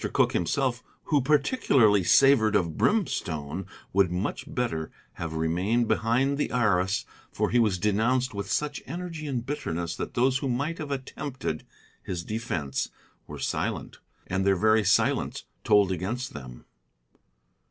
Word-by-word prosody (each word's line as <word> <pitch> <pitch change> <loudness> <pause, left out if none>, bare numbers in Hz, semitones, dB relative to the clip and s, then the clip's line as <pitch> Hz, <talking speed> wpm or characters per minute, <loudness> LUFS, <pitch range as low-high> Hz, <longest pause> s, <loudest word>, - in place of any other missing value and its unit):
Cooke - - +3
himself, 125 - 0 0.2
who 145 -3 +2
particularly 135 - +3
savored 110 +1 +5
of 85 -6 +1
brimstone, 90 - -1 0.3
would 95 -2 +4
much 90 +4 -2
better 95 -11 -2 0.3
have 80 -1 -4
remained 90 +9 +1
behind 120 +6 +1
the - - 0
arras, 100 -5 +1 0.3
for - - -1
he 120 - +4
was 105 -5 +2
denounced 115 +6 +1
with 100 0 -5
such 150 -1 -1
energy 165 0 -5
and 125 -4 -2
bitterness 85 - -3
that - - -5
those 130 +2 +3
who 135 - -2
might 145 +7 -2
have 155 -2 -5
attempted 135 - -4 0.3
his 90 -2 -4
defence 95 -11 -3 0.4
were - - -8
silent, - - -3 0.3
and 95 +1 -1
their 100 0 +3
very 110 +3 +3
silence - - +1 0.2
told 105 -3 +4
against 105 +8 -3
them. 65 -4 -10
110 Hz, 140 wpm, -27 LUFS, 90-135 Hz, 0.4 s, savored